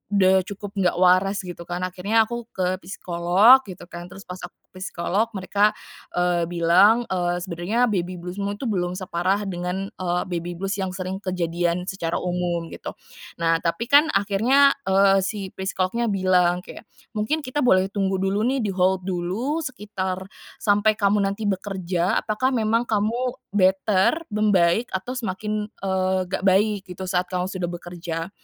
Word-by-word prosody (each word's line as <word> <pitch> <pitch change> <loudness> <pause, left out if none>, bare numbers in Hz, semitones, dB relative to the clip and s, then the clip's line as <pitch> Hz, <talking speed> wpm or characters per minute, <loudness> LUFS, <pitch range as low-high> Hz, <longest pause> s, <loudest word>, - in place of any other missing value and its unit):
udah 190 -1 +5
cukup 200 +1 -8
nggak 185 -3 +1
waras," 185 +2 +4
gitu 175 -1 -7
kan. 175 +1 -5
Akhirnya, 190 +5 +1
aku 235 +1 -5
ke 185 0 0
psikolog, 185 +7 +4
gitu 180 -4 -10
kan. 175 0 -9
Terus, 195 - -12
pas 180 0 -7
aku - - -7 0.2
ke 185 - -13
psikolog, 195 +5 -1
mereka, 205 +1 +2 0.4
eee, 175 -1 +1
bilang, 185 +8 +4
eee, 175 -1 -1
"Sebenarnya 185 +7 0
baby 180 -3 -2
blues-mu 190 +3 -4
itu, 265 - -3
belum 180 -3 -1
separah 190 +2 -1
dengan, 180 +2 -3
eee, 180 -1 -1
baby 175 -1 -4
blues 195 +1 -2
yang 190 -2 -2
sering 185 +1 -5
kejadian 175 0 -1
secara 170 -4 -2
umum," 175 -2 -2
gitu. - - -7 0.4
Nah, 165 -1 +2
tapi 170 +7 -1
kan, 295 +3 +6
akhirnya, 245 +8 +4 0.2
eee, 195 0 +5
si 195 -2 -4
psikolognya 190 +4 -1
bilang 180 -2 +2
kayak, - - -10 0.3
"Mungkin 220 +9 -1
kita 290 +3 -2
boleh 190 -6 +4
tunggu 195 -2 0
dulu 195 +2 0
nih, 265 +2 +1
di-hold 190 -2 +1
dulu, 195 - -2
sekitar 205 -9 -4 0.4
sampai 210 +1 +2
kamu 205 0 +2
nanti 205 +2 -4
bekerja, 190 -3 -1
apakah 220 +5 +1
memang 230 0 +1
kamu 230 +4 0 0.2
better, 195 - +2
membaik? 210 0 +3
Atau 190 +7 -3
semakin, 210 -2 -3
eee, 190 -2 -1
nggak - - -2
baik, 205 +2 +3
gitu, 180 +1 -6
saat 180 -1 0
kamu 180 0 -1
sudah 180 -3 -3
bekerja." 170 -1 -5
190 Hz, 155 wpm, -23 LUFS, 180-210 Hz, 0.4 s, kan